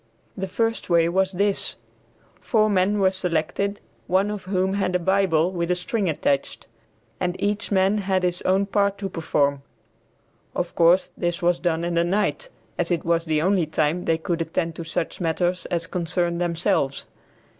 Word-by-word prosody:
The 190 -1 -3
first 225 +1 -1
way 170 -1 +4
was 190 +2 +1
this: 200 +1 0 0.6
four 215 -2 +2
men 195 +2 +2
were 190 -2 +3
selected, 185 +2 -1 0.3
one 190 +3 +2
of 205 -3 -6
whom 190 0 0
had 195 -2 0
a - - +3
Bible 185 -2 +2
with 170 -2 -2
a 180 - +3
string 185 +2 -1
attached, 140 -2 -1 0.5
and 180 -1 -1
each 205 +1 -2
man 195 +2 +3
had 190 -2 0
his 180 0 0
own 190 +2 +2
part 200 0 +1
to 195 -1 -4
perform. 145 -5 0 0.9
Of - - -2
course 170 +3 +4
this 175 -1 -2
was 175 0 +2
done 170 -2 0
in 175 0 -1
the 170 0 +3
night 205 - -1 0.3
as - - 0
it 175 -3 -1
was 165 0 +1
the 155 -1 +1
only 185 -3 +2
time 155 +3 0
they 165 - +2
could 170 0 -2
attend 165 0 -2
to 170 - -4
such 165 +2 -3
matters 175 +2 0
as 170 -1 -2
concerned 175 0 -1
themselves. 170 -5 0
180 Hz, 175 wpm, -24 LUFS, 170-195 Hz, 0.9 s, way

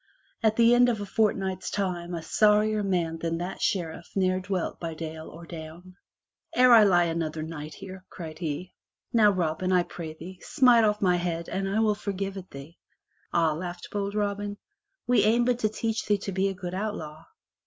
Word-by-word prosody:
At 220 -2 +3
the 235 +1 +5
end 245 0 +5
of 230 -3 -1
a 205 - -4
fortnight's 190 -2 0
time 180 -3 -2
a 165 - -5
sorrier 210 +3 +3
man 175 -5 -1
than 165 0 -2
that 175 +2 -5
Sheriff 170 -3 -2
ne'er 185 -1 +2
dwelt 185 -1 -3
by 165 -2 -5
dale 160 0 -6
or 170 +1 -11
down. 165 +2 -10 0.6
"Ere 250 -1 +7
I 225 - +9
lie 175 -4 +5
another 165 -2 -2
night 155 -1 -7
here," 190 -1 -10
cried 160 -3 -8
he, 170 +2 -4 0.4
"now, 220 -3 +6
Robin, 185 -1 0
I 180 -1 +4
pray 165 -2 -7
thee, 180 +4 -10
smite 245 -5 +4
off 210 -1 +1
mine 180 -2 +3
head 170 -1 -3
and 195 0 -2
I 205 +3 0
will 215 -1 +3
forgive 195 -1 -4
it 190 -1 -8
thee." 140 +5 -11 0.5
"Ah," 165 -2 +2
laughed 175 +2 -6
bold 200 0 -2
Robin. 205 0 -2 0.5
"We 245 -4 +4
aim 235 +3 +3
but 245 -1 +1
to 215 - +1
teach 225 +1 -2
thee 205 -1 +3
to 200 0 -5
be 190 +1 +1
a 195 - -3
good 180 -1 -6
outlaw." 165 -6 -5
185 Hz, 195 wpm, -27 LUFS, 170-210 Hz, 0.6 s, I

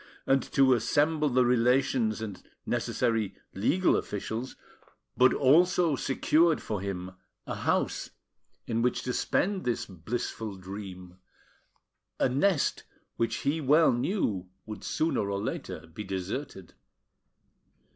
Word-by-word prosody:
and 135 0 +3
to 135 -1 +3
assemble 150 +5 +2
the 125 -1 +3
relations 125 -2 +2
and 105 -4 -6 0.2
necessary 110 -4 0 0.2
legal 175 - +2
officials, 110 +5 -4 0.6
but 130 0 +5
also 170 +3 +4
secured 155 +5 +2
for 105 -3 -4
him 95 -2 -4 0.3
a - - -4
house - - -1 0.6
in 115 0 -1
which 125 +1 0
to 125 - -2
spend 195 +8 0
this 120 -2 -1
blissful 105 +3 -5
dream, 95 -1 -9 1.0
a - - +4
nest 145 +5 +1 0.3
which 115 - 0
he 155 +3 +1
well 150 +4 +5
knew 115 - -1 0.2
would 110 -1 -8
sooner 155 -10 0
or 100 - -1
later - - -5
be 105 - -6
deserted. 95 - -5
120 Hz, 115 wpm, -29 LUFS, 100-145 Hz, 1.0 s, but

